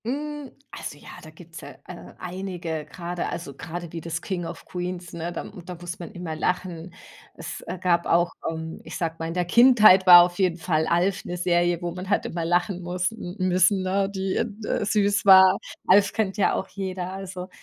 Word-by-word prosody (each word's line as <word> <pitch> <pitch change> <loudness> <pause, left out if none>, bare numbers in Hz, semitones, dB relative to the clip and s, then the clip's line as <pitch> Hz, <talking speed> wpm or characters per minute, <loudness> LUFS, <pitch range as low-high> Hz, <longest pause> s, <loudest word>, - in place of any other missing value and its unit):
Hm, 290 +2 -4 0.2
also 145 - -7
ja, - - -14
da 155 - -12
gibt's 165 +1 -13
ja, - - -10
äh, 180 - -11
einige 175 -4 -5
grade, 175 0 -4
also 165 -5 -6
grade 170 +4 -7
wie 165 - -6
das 165 0 -5
„King 180 -3 -3
of - - -9
Queens“, 180 -1 -6
ne, 170 +1 -4
da - - -5 0.2
da 180 +1 -8
muss 175 +1 -8
man 170 - -8
immer 175 -3 -5
lachen. 175 +1 -3 0.4
Es, - - -7
äh, - - -4
gab 170 -1 +1
auch 170 +1 +3 0.2
ähm, 160 0 -6
ich - - -7
sage 165 -2 -2
mal, 165 - -3
in 165 - -5
der 180 -1 0
Kindheit 215 -3 +6
war 175 -1 +11
auf 175 +1 -3
jeden 180 -3 +2
Fall 160 -1 0
„Alf“ 180 +3 +1
'ne 175 - -4
Serie, 175 0 +1
wo 175 - -2
man 185 +2 -7
halt 205 - +1
immer 165 -1 -3
lachen 175 +2 0
muss 180 +1 -2
n 185 -5 -8
müssen, 185 +1 +2
ne, 195 +1 0
die 190 -1 -2
d 215 -1 -8
äh, - - -1
süß 205 -1 +1
war. 190 -1 +8 0.3
„Alf“ 200 +1 +5
kennt 205 -4 -1
ja 205 - +2
auch 190 - -3
jeder. 185 -2 -5
Also, 190 -1 -7
180 Hz, 210 wpm, -24 LUFS, 170-190 Hz, 0.4 s, war